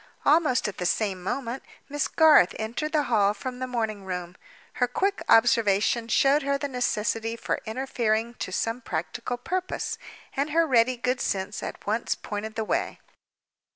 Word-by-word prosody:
Almost 300 -6 +3
at 205 - -6
the 180 - -2
same 195 -2 0
moment 240 +6 -3 0.3
Miss 290 0 -1
Garth 310 - +5
entered 235 +8 -3
the 305 -2 +2
hall 210 -5 +2
from 250 +4 -6
the 255 - -3
morning 220 -5 -2
room. 180 -1 -5 0.5
Her 245 - +5
quick 390 +10 0
observation 225 0 +4
showed 275 +6 +4
her 280 0 0
the 285 - -3
necessity 225 -3 -1
for - - -3
interfering 230 -1 -1
to - - -4
some 230 +6 -1
practical 245 -1 -4
purpose; 370 +9 -3 0.4
and 280 +2 0
her 330 +2 +3
ready 250 -3 +3
good 250 +2 -1
sense 195 +1 -2
at - - -7
once 220 +3 0
pointed 215 +1 -6
the 220 - -2
way. 345 - -1
235 Hz, 160 wpm, -26 LUFS, 215-275 Hz, 0.5 s, Garth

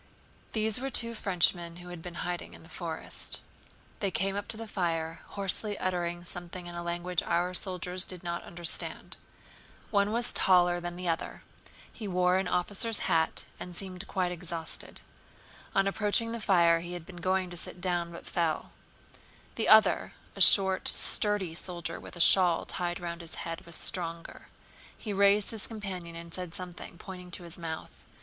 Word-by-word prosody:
These 220 0 +2
were 270 +1 -2
two 235 -3 0
Frenchmen 175 -4 +2
who 180 +1 -10
had 175 -2 -7
been 175 +1 -8
hiding 175 0 -4
in - - -14
the 165 - -15
forest. 165 -3 -4 0.6
They 200 - 0
came 195 +1 0
up 205 - -3
to 220 - -5
the 225 - -5
fire, 165 -5 -1
hoarsely 200 +1 -3
uttering 175 -1 -2
something 175 0 -7
in 175 - -7
a 175 - -4
language 175 0 -1
our 175 +1 0
soldiers 180 0 -1
did 185 -2 -4
not 170 -1 -3
understand. 170 -1 0 0.8
One 200 -1 +3
was 235 +2 +1
taller 175 -1 +4
than 175 0 -5
the 180 0 -4
other; 165 -1 -2 0.5
he 215 - -6
wore 180 -1 +3
an 190 - -1
officer's 205 +5 0
hat 165 -3 +1 0.2
and 180 -1 -7
seemed 185 0 -5
quite 185 -2 0
exhausted. 170 -2 -4 0.7
On 195 0 +4
approaching 210 +3 +1
the 230 -1 -4
fire 170 -5 +5
he 175 +1 -6
had 175 -2 -6
been 180 -1 -11
going 185 +1 0
to - - -6
sit 175 - -6
down, 175 -2 -1
but 170 - -9
fell. 165 -2 -1 0.8
The 225 - -1
other, 220 0 +6 0.2
a - - -5
short 190 -2 +8
sturdy 205 -5 +3
soldier 175 0 -4
with - - -10
a - - -9
shawl 175 -1 +5
tied 175 -1 -2
round 170 -1 -5
his 165 0 -8
head, 165 0 -6
was 170 - -6
stronger. 170 -1 -3 0.5
He 210 - -4
raised 200 +1 +5
his 220 -3 -1
companion 190 -6 -6
and 170 0 -9
said 180 -2 -3
something, 180 -1 -7
pointing 180 -1 -9
to 175 0 -5
his 170 0 -6
mouth. 160 -1 -6
180 Hz, 175 wpm, -30 LUFS, 170-195 Hz, 0.8 s, short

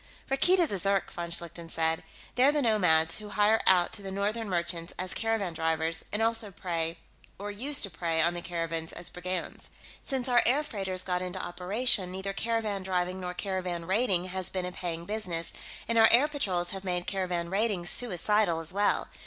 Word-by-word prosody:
"Rakkeed 335 +8 +4
is 345 -4 +3
a 195 - 0
Zirk," 195 +1 +1
von 170 0 -5
Schlichten 170 0 -2
said. 160 0 +1 0.3
"They're 260 +3 +4
the 295 -1 0
nomads 165 -8 +3
who 210 -1 -9
hire 210 +2 +3
out 180 -2 +4
to 205 - -4
the 195 - -6
northern 205 +3 -2
merchants 170 -1 -2
as 185 0 -3
caravan 225 -6 -1
drivers, 160 0 0
and 210 +2 0
also 225 -2 0
prey, 170 -3 -3 0.4
or 205 +1 -5
used 265 +8 +3
to 200 - 0
prey, 165 +1 -1
on 170 +2 +3
the 175 - -5
caravans 165 -2 -4
as 175 - -3
brigands. 180 0 -4 0.3
Since 265 -2 -2
our 245 -1 +5
air 275 +5 +6
freighters 190 -8 -3
got 180 -1 -1
into 185 +1 -5
operation, 185 +3 +2
neither 190 +1 -4
caravan 220 -2 -1
driving 185 0 -2
nor 180 -1 -5
caravan 180 -3 -3
raiding 190 -2 +1
has 185 0 -2
been 185 -1 -3
a 180 - -4
paying 170 -2 -5
business, 180 -5 -3 0.3
and 230 0 +2
our 225 - +8
air 255 +6 +7
patrols 190 -13 -1
have 195 0 -6
made 180 -2 -2
caravan 180 -3 -2
raiding 200 -3 0
suicidal 205 -3 +2
as 165 +2 -3
well. 205 +1 +1
185 Hz, 190 wpm, -29 LUFS, 175-215 Hz, 0.4 s, our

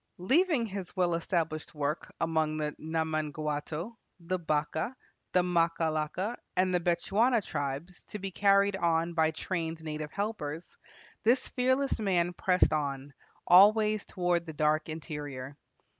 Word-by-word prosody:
Leaving 275 - +3
his 195 -3 -6
well 180 -2 +2
established 165 -2 -2
work 150 +1 -2
among 160 -2 0
the 150 -1 -2
Namangwato, 155 +3 -2 0.2
the 180 +2 -2
Bakaa, 155 - -1 0.4
the 180 - +3
Makalaka, 170 +3 0 0.2
and 185 0 +2
the 180 - +3
Bechuana 200 +8 +2
tribes 145 +4 -4
to 210 - -6
be 195 -1 -5
carried 200 +1 +3
on 170 -1 +1
by 160 -1 +3
trained 160 0 -4
native 155 -1 -5
helpers, 180 -6 -4 0.5
this 240 +4 +2
fearless 260 +1 +1
man 180 -4 +1
pressed 180 -1 +2
on 140 -2 -2 0.3
always 210 +3 +6
toward 175 -2 0
the 160 - -6
dark 155 +1 +1
interior. 145 -4 -6
170 Hz, 130 wpm, -30 LUFS, 155-195 Hz, 0.5 s, always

